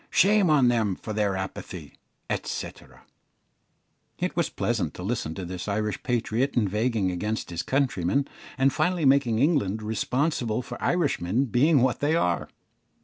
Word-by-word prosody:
Shame 200 -1 +4
on 145 -5 +5
them 110 -5 +1
for 110 - -7
their 105 -2 0
apathy," 90 -4 -7 0.5
&c. - - -4 1.5
It - - -2
was - - +1
pleasant - - -2
to 90 - -7
listen 95 -7 -2
to 95 - -5
this 90 +2 -6
Irish 105 0 -2
patriot 125 +2 -1
inveighing 105 -1 +1
against 105 +3 -3
his 85 0 -2
countrymen, 130 -3 0 0.3
and 135 0 +3
finally 175 +1 +1
making 135 -4 +4
England 115 - +1
responsible 125 +1 -1
for - - -8
Irishmen 135 - +1
being 135 +3 +3
what 130 -1 +1
they 150 +3 +1
are. 90 - 0
115 Hz, 145 wpm, -26 LUFS, 100-140 Hz, 1.5 s, on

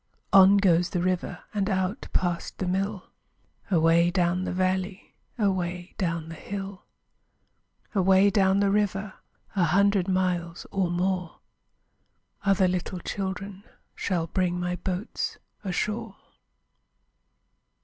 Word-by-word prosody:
On 195 +1 +8
goes 180 -3 +3
the 180 - -1
river 185 -1 -2
And 205 -1 0
out 190 +1 -1
past 175 -2 -1
the 190 - -2
mill, 195 +2 -2 0.6
Away 170 -1 +4
down 175 0 +1
the - - -2
valley, 185 +1 -1 0.2
Away 180 -4 -1
down 165 -3 -1
the 165 - -7
hill. 195 +3 -7 1.1
Away 190 0 +4
down 195 -1 +3
the 200 -1 +3
river, 200 -1 0 0.4
A 185 -3 +3
hundred 195 +2 +3
miles 180 -2 -1
or 190 -3 0
more, 180 0 -1 1.1
Other 195 -2 +3
little 180 0 -2
children 195 +2 -5 0.3
Shall 175 -4 -1
bring 180 +1 -1
my 180 0 -1
boats 185 +4 -3 0.3
ashore. 210 +3 -2
185 Hz, 115 wpm, -26 LUFS, 180-195 Hz, 1.1 s, On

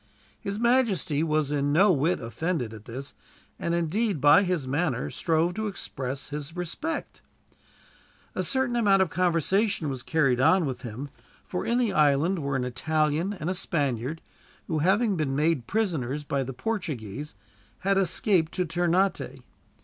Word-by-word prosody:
His 200 +1 -4
majesty 220 - +2
was 155 -2 +1
in 145 -1 +1
no 190 +7 +5
whit 160 +2 +1
offended 120 +1 -3
at 110 -1 -11
this: 130 +4 -7 0.5
and 170 - -1
indeed, 180 +3 0
by 145 +7 +7
his 180 -8 -1
manner, 135 -3 -1
strove 165 +1 +1
to 220 +2 -2
express 135 -9 -5
his 150 +2 -6
respect. 180 - -4 1.1
A - - -1
certain 260 -2 +1
amount 200 -5 +4
of 180 - -5
conversation 180 +1 +1
was 130 -2 -4
carried 135 -4 +2
on 175 +7 +4
with 130 -3 -4
him, 125 +3 -6 0.4
for 180 - -4
in 235 - +2
the 240 -4 +1
island 150 +5 +3
were 140 -2 -2
an 130 - 0
Italian 155 +7 0
and 170 -5 -5
a 185 - +1
Spaniard; 145 - -2 0.4
who, 160 -2 -1
having 195 +5 +2
been 140 -4 -1
made 150 -4 +1
prisoners 150 - -1
by 140 -1 -1
the 135 0 -3
Portuguese, 145 - -4 0.5
had 195 0 +2
escaped 185 -2 +2
to 180 - 0
Ternate. 175 +3 0
160 Hz, 155 wpm, -27 LUFS, 140-190 Hz, 1.1 s, by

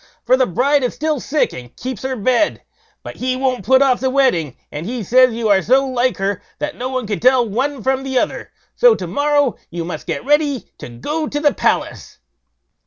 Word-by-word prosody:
for 250 - +5
the 260 -1 +2
bride 275 - +2
is 250 - -2
still 310 -2 -1
sick, 295 +4 0
and 125 -1 -11
keeps 255 -3 -5
her 265 0 -3
bed; 255 +7 +1 0.4
but - - -9
he 255 0 -1
won't 255 -1 -1
put 265 +1 +4
off 260 -2 +2
the 260 - 0
wedding; 250 - +1
and 150 +4 -6
he 240 -1 -4
says, 255 +5 +5
you 230 -1 -1
are 200 -2 +4
so 260 +9 +3
like 255 -1 0
her, 195 0 -2 0.2
that 295 0 -4
no 255 +1 -4
one 255 -2 -3
could 205 -1 -3
tell 250 -1 +4
one 260 +4 -2
from 265 0 +1
the 265 -1 -2
other; - - -2 0.2
so 485 -2 +5
to - - -5
morrow 290 -3 +1
you 170 -1 -5
must 175 - -7
get - - -3
ready 290 -2 +1
to - - -8
go 300 - -3
to 290 - -3
the 295 -1 +2
palace." - - -2
255 Hz, 215 wpm, -18 LUFS, 230-275 Hz, 0.4 s, for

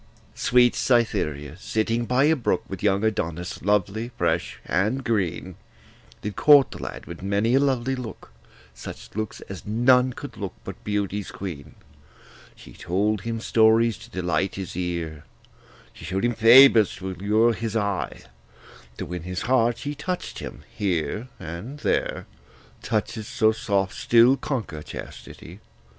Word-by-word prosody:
Sweet 125 -1 +4
Cytherea, 90 - 0
sitting 115 +3 -1
by 125 +3 +2
a 155 +2 +4
brook 120 - 0
With 95 - -7
young 100 0 +2
Adonis, 90 -5 -2
lovely, 105 +3 0
fresh, - - -1
and 105 +10 0
green, 100 -9 -2 0.7
Did 105 -1 -4
court 145 -3 +6
the - - -8
lad - - -7
with 85 +1 -9
many 100 +5 +1
a 135 - +5
lovely 135 -2 +1
look, 125 - -8 0.4
Such - - -10
looks 110 0 -4
as 95 -3 -9
none 125 +3 +4
could - - -9
look - - -5
but - - -9
beauty's 105 -1 -2
queen, 85 -8 -7 0.8
She - - -14
told 100 +3 -1
him 115 +1 -3
stories 110 0 +4
to - - -13
delight 95 +1 -1
his 95 -3 -6
ear; 85 -4 -3 0.7
She - - -14
show'd 95 +4 -1
him 120 - +1
favours 115 -1 +7
to 95 0 -5
allure 105 +5 +2
his 115 0 -4
eye; 100 -3 -2 0.8
To - - -4
win 90 -1 -5
his 90 +1 -4
heart, 120 0 +2
she 145 0 -4
touch'd 180 +5 -4
him - - -8
here 95 - -1
and 95 - -7
there, - - -1 0.6
Touches 110 -1 -2
so 110 0 +3
soft 100 -3 -1
still 120 +3 +5
conquer 115 - -4
chastity. - - -10
110 Hz, 145 wpm, -24 LUFS, 95-120 Hz, 0.8 s, favours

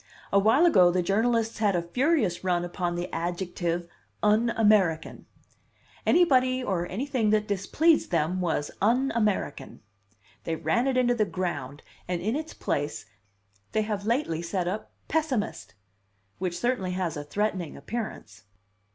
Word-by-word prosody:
A 200 - +6
while 225 - +4
ago 185 - +6
the 180 0 +1
journalists 225 +4 +1
had 205 -3 +2
a 170 - 0
furious 250 - +1
run 175 -1 +1
upon 175 0 -3
the 175 +1 -3
adjective 175 0 -2 0.4
'un 215 +3 +3
American.' 200 -7 +2 0.8
Anybody 255 -7 +4
or 180 -6 -1
anything 240 +2 -1
that 210 0 +2
displeased 280 - +2
them 175 +2 0
was 160 -4 -1
'un 250 +6 +2
American.' 215 -4 -1 0.6
They 165 - -2
ran 190 - 0
it 265 -1 +1
into 245 -1 +3
the 220 -3 +1
ground, 145 -8 -4 0.2
and 180 -1 -1
in 215 +8 -1
its 315 +1 -5
place 145 -6 -2 0.7
they 215 - +2
have 210 -2 -3
lately 230 - 0
set 175 +1 -2
up 205 +4 -4 0.2
'pessimist,' 265 - -2 0.6
which 180 -2 -2
certainly 240 -7 -1
has 180 -3 -2
a 145 - -5
threatening 185 0 -2
appearance. 155 - -6
195 Hz, 145 wpm, -27 LUFS, 175-235 Hz, 0.8 s, A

